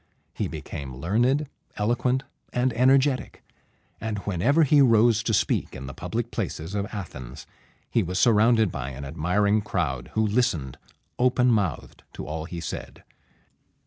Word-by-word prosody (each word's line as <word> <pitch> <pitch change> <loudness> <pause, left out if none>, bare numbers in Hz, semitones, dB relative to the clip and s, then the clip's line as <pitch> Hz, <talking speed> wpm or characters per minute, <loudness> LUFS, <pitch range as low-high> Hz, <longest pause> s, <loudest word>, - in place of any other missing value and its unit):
He - - -2
became 65 -3 -7
learned, 120 - +1 0.3
eloquent, 125 +4 +1 0.3
and 125 0 +1
energetic; 130 +2 +2 0.6
and 110 -1 -3
whenever 115 - +3
he 145 0 +5
rose 115 -2 +5
to 115 - -1
speak 110 - 0
in 65 0 -7
the 65 - -7
public 115 - -4
places 90 -4 -4
of 100 0 -1
Athens, 65 - -8 0.4
he 115 - +1
was 90 -1 -3
surrounded 110 -1 +4
by 65 - -4
an 70 +1 -7
admiring 100 +8 +1
crowd, 75 - -2
who 110 0 +3
listened 100 - 0 0.4
open 125 0 +3
mouthed 100 - -1
to - - -7
all 80 +1 -4
he 85 0 -6
said. 60 -5 -7
105 Hz, 145 wpm, -25 LUFS, 80-120 Hz, 0.6 s, he